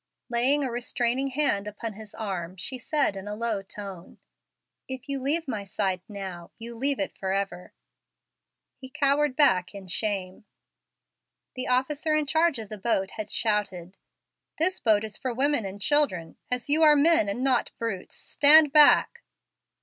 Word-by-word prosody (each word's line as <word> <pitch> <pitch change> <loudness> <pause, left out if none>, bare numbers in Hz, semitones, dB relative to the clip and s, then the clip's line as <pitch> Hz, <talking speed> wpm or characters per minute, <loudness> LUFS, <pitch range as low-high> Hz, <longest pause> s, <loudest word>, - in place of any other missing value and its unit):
Laying 255 +5 +2
a 260 - -3
restraining 245 +2 -2
hand 265 -7 -1
upon 210 +2 -6
his 215 0 -12
arm, 185 -4 -6
she 255 +9 -3
said, 285 -3 0
in 195 +1 -8
a 210 - -5
low 225 -2 -2
tone, 195 -2 -10 0.7
"If 260 0 -8
you 275 -1 -3
leave 305 +5 -1
my 215 -6 -4
side 190 -2 -2
now, 190 -4 -8
you 235 +1 -7
leave 270 +4 -1
it 195 - -2
forever." 190 -2 -4 1.1
He 260 - -11
cowered 285 0 +1
back 190 -11 +2
in 195 -1 -9
shame. 190 0 -2 1.1
The 255 -1 -4
officer 290 +5 0
in 305 -1 0
charge 320 +1 +1
of 220 -3 -8
the 215 - -8
boat 195 -2 -1
had 215 -1 -7
shouted, 200 -5 -2 0.6
"This 365 +4 +2
boat 215 -2 +2
is 215 -1 -5
for 255 -3 -4
women 275 -3 +1
and 195 +1 -7
children; 200 - +1
as 250 +1 -1
you 300 +3 +4
are 305 -1 +6
men 295 -7 +4
and 225 +6 -3
not 260 -3 +1
brutes, 220 -6 -5
stand 300 0 +6
back." 305 +9 +5
235 Hz, 160 wpm, -25 LUFS, 200-280 Hz, 1.1 s, are